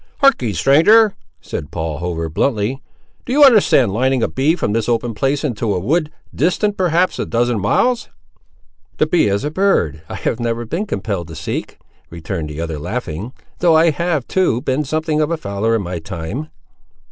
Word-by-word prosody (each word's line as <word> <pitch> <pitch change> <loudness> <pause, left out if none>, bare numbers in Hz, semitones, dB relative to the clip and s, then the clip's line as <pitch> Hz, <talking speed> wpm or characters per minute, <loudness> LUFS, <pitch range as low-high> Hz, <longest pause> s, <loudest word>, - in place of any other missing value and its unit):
"Harkee, 230 - +4
stranger," 195 - +5 0.3
said 75 - -6
Paul 80 -3 -4
Hover, 85 -1 -3
bluntly; 110 - -1 0.4
"do - - -6
you 290 +3 +5
understand 210 - +5
lining 130 +2 +1
a - - +2
bee 145 +5 +1
from 105 - -1
this 115 +1 -1
open 115 0 0
place 135 +6 -1
into 115 -7 -1
a - - 0
wood, 150 - 0 0.2
distant, 200 +6 +1
perhaps, 180 -1 +1
a - - -1
dozen 120 -1 0
miles?" 240 - +1 0.9
"The - - +3
bee 160 -5 +2
is 100 +3 0
a 150 - -2
bird 120 - +1
I - - -5
have 115 - -2
never 120 0 -2
been 175 - -3
compelled 100 - -3
to 80 - -9
seek," 80 - -5 0.3
returned 85 -1 -5
the 75 +1 -7
other, 80 -2 -4
laughing; 105 - -5 0.3
"though 170 -2 +4
I 165 +1 +4
have, 155 -3 -1
too, 180 -11 +1
been 135 +3 0
something 155 +1 -1
of 150 - +1
a 170 - -1
fowler 105 -2 -1
in 110 - -1
my 90 -1 -4
time." 85 - -6
120 Hz, 180 wpm, -18 LUFS, 100-160 Hz, 0.9 s, stranger